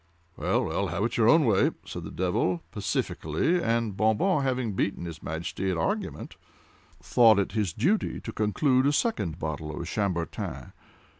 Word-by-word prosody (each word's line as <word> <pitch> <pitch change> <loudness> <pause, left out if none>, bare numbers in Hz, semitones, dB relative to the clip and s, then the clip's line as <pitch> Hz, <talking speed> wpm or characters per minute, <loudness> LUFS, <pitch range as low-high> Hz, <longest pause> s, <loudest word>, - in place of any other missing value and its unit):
"Well, - - 0
well, 100 - -1
have 85 +4 -2
it 115 +1 -1
your 115 -1 +4
own 160 +1 +6
way!" 105 -5 +4 0.2
said - - -7
the - - -6
devil, 90 -1 0
pacifically, 120 - -1
and 115 - 0
Bon 110 +2 +2
Bon, 185 -5 +2
having 130 -5 -1
beaten 95 -2 -1
his 80 -2 -7
Majesty 85 +4 -3
at 90 - -1
argument, 80 - -3 0.6
thought 115 -4 +5
it 100 - 0
his 105 -5 0
duty 200 - 0
to 115 - -6
conclude 130 +6 +2
a 145 - +2
second 105 - 0
bottle 75 -2 -4
of 85 - -4
Chambertin. 85 -3 -3
105 Hz, 165 wpm, -27 LUFS, 85-120 Hz, 0.6 s, own